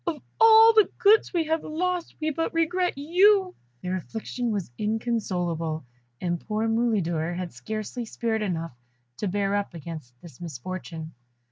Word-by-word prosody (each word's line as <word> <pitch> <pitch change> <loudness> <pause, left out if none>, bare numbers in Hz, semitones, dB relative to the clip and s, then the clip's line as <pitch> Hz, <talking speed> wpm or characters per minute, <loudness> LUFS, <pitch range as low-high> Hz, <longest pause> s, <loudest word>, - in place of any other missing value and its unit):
Of 320 -3 -1 0.2
all 450 0 +8
the 430 -2 +5
goods 435 -1 +5
we 340 -3 +1
have 320 0 0
lost 355 +2 -2
we 310 0 0
but 325 +2 -2
regret 350 0 +1
you!" 370 +5 +4 0.3
Their 185 +1 -1
affliction 230 +6 -4
was 200 - -2
inconsolable, 180 - -2 0.3
and 175 -1 -1
poor 215 +1 -1
Mulidor 185 -8 0
had 180 -1 -5
scarcely 215 - -5
spirit 225 -1 -2
enough 165 - -3 0.4
to 210 - -2
bear 200 +1 0
up 200 -3 -2
against 155 -7 -8
this 160 -6 -14
misfortune. 165 +1 -6
215 Hz, 145 wpm, -26 LUFS, -, 0.4 s, all